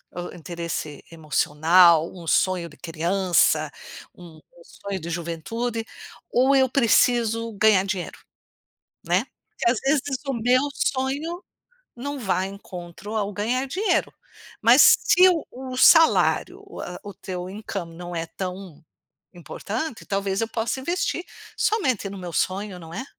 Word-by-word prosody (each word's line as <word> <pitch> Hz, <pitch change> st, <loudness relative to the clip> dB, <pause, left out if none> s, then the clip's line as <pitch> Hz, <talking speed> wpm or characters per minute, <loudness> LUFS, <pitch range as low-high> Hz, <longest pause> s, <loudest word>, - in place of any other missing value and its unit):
hã, 175 Hz, 0 st, -5 dB
interesse 170 Hz, -3 st, -6 dB
emocional, 160 Hz, +2 st, +3 dB
um 170 Hz, -3 st, -11 dB
sonho 180 Hz, -1 st, +1 dB
de 155 Hz, -, -17 dB
criança, 165 Hz, -2 st, +1 dB, 0.4 s
um 170 Hz, -3 st, -14 dB, 0.2 s
sonho 200 Hz, -, -7 dB
de 170 Hz, -, -6 dB
juventude, 215 Hz, +8 st, -4 dB, 0.5 s
ou 265 Hz, +3 st, +3 dB
"Eu 265 Hz, -1 st, +4 dB
preciso 230 Hz, -2 st, +2 dB
ganhar 205 Hz, -2 st, +4 dB
dinheiro", 190 Hz, -3 st, -4 dB, 0.9 s
né, -, -, +1 dB, 0.2 s
porque -, -, -1 dB
às 240 Hz, -, -1 dB
vezes 275 Hz, +1 st, +1 dB, 0.3 s
o 275 Hz, -, 0 dB
meu 245 Hz, +2 st, +2 dB
sonho 280 Hz, +9 st, -2 dB, 0.5 s
não 285 Hz, +3 st, -5 dB
vai 190 Hz, -4 st, -1 dB
em 195 Hz, -, -9 dB
encontro 185 Hz, +1 st, -9 dB
ao 205 Hz, -2 st, -1 dB
"ganhar 240 Hz, +7 st, -1 dB
dinheiro". 370 Hz, +7 st, 0 dB, 0.5 s
Mas -, -, +7 dB, 0.2 s
se 365 Hz, +1 st, +5 dB
o 335 Hz, -4 st, -1 dB
o 255 Hz, 0 st, -7 dB
salário, 255 Hz, -, +5 dB, 0.2 s
ah, 180 Hz, -, -7 dB
o 205 Hz, -1 st, -9 dB
teu 180 Hz, 0 st, -6 dB
incoming 190 Hz, -4 st, -6 dB
não 175 Hz, 0 st, -7 dB
é 165 Hz, 0 st, -3 dB
tão 180 Hz, -2 st, -7 dB, 0.5 s
importante, 220 Hz, -, -5 dB
talvez 195 Hz, -1 st, -1 dB
eu 225 Hz, -, -1 dB
possa 230 Hz, +3 st, -2 dB
investir 350 Hz, +4 st, -2 dB, 0.3 s
somente 265 Hz, -, 0 dB
no 200 Hz, -, -8 dB
meu 180 Hz, -2 st, -7 dB
sonho, 190 Hz, +3 st, -2 dB
não 165 Hz, -2 st, -11 dB
é? 260 Hz, -, -4 dB
200 Hz, 135 wpm, -24 LUFS, 175-250 Hz, 0.9 s, Mas